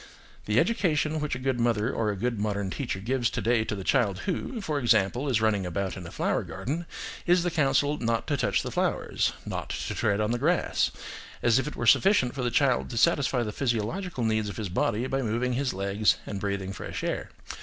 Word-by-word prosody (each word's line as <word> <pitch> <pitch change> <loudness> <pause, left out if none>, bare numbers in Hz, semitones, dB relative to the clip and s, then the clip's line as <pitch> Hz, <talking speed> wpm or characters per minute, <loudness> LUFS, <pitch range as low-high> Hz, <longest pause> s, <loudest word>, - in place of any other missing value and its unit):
The 105 +2 +3
education 160 - +1
which 150 -3 -2
a - - -3
good 130 -1 -1
mother 115 0 +1
or 110 -2 0
a 105 - -1
good 115 +2 -2
modern 100 -2 -1
teacher 125 -5 -3
gives 120 +3 0
to 115 - -3
day 115 +1 +2
to 105 - -2
the 95 - -6
child 105 -5 +1
who, 210 +6 -2
for 155 -8 -2
example, 120 +2 +2
is 115 -4 +2
running 110 -3 +2
about 95 +1 -2
in 90 -3 -7
a - - -9
flower - - 0
garden 165 +7 -4 0.4
is 175 0 +4
the 175 - 0
counsel 145 -1 +2
not 115 -1 0
to 145 - 0
touch 135 - +1
the - - -4
flowers, - - 0
not - - -4
to - - -3
tread 100 -1 +1
on 105 +1 +1
the 120 - 0
grass; 170 +6 +2 0.5
as 120 +1 +4
if 130 - -2
it 150 - -5
were 120 - -3
sufficient 135 - +4
for 140 - -4
the 125 - +1
child 130 +1 +2
to 120 - -5
satisfy 135 -4 +3
the 105 - -3
physiological 130 - -2
needs 110 -1 +1
of 100 - -7
his 105 -4 -3
body 105 +6 0
by 135 +1 -1
moving 120 +2 0
his 130 +1 0
legs 100 +2 +1
and 100 - -4
breathing 100 -1 -2
fresh 90 - -6
air. - - -2
120 Hz, 220 wpm, -27 LUFS, 105-140 Hz, 0.5 s, is